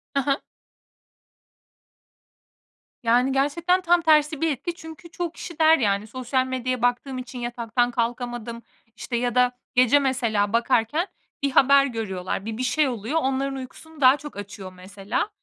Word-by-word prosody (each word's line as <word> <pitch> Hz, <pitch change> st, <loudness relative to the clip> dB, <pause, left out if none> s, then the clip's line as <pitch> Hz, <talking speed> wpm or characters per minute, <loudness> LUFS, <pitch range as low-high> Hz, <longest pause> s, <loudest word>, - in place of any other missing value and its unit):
Hı 275 Hz, -, +3 dB
hı. 275 Hz, +1 st, +1 dB, 2.7 s
Yani 245 Hz, +3 st, +3 dB
gerçekten 335 Hz, +7 st, +1 dB
tam 350 Hz, 0 st, +3 dB
tersi 310 Hz, -2 st, +3 dB
bir 325 Hz, -1 st, +2 dB
etki 315 Hz, +5 st, -4 dB
çünkü 320 Hz, 0 st, -12 dB
çoğu 345 Hz, -1 st, -3 dB
kişi 340 Hz, -1 st, -9 dB
der, 320 Hz, 0 st, +6 dB
yani, 205 Hz, -3 st, 0 dB
sosyal 255 Hz, +2 st, -1 dB
medyaya 255 Hz, -1 st, -2 dB
baktığım 245 Hz, +2 st, 0 dB
için 250 Hz, 0 st, -7 dB
yataktan 240 Hz, 0 st, -1 dB
kalkamadım, 240 Hz, -1 st, -3 dB, 0.3 s
işte, 240 Hz, -, -5 dB
ya 245 Hz, +1 st, -1 dB
da 250 Hz, 0 st, +4 dB, 0.2 s
gece 255 Hz, +3 st, +5 dB
mesela 230 Hz, -6 st, 0 dB
bakarken 240 Hz, -, +1 dB, 0.4 s
bir 280 Hz, -, +1 dB
haber 275 Hz, +1 st, +5 dB
görüyorlar, 195 Hz, -5 st, -4 dB
bir 225 Hz, 0 st, -4 dB
bir 255 Hz, -, -2 dB
şey 295 Hz, +3 st, +2 dB
oluyor. 245 Hz, +6 st, -2 dB
Onların 270 Hz, +1 st, -1 dB
uykusunu 290 Hz, +4 st, -10 dB
daha 260 Hz, +1 st, +7 dB
çok 295 Hz, -6 st, -10 dB
açıyor 195 Hz, -2 st, -8 dB
mesela. 195 Hz, -, -4 dB
255 Hz, 150 wpm, -24 LUFS, 235-290 Hz, 2.7 s, daha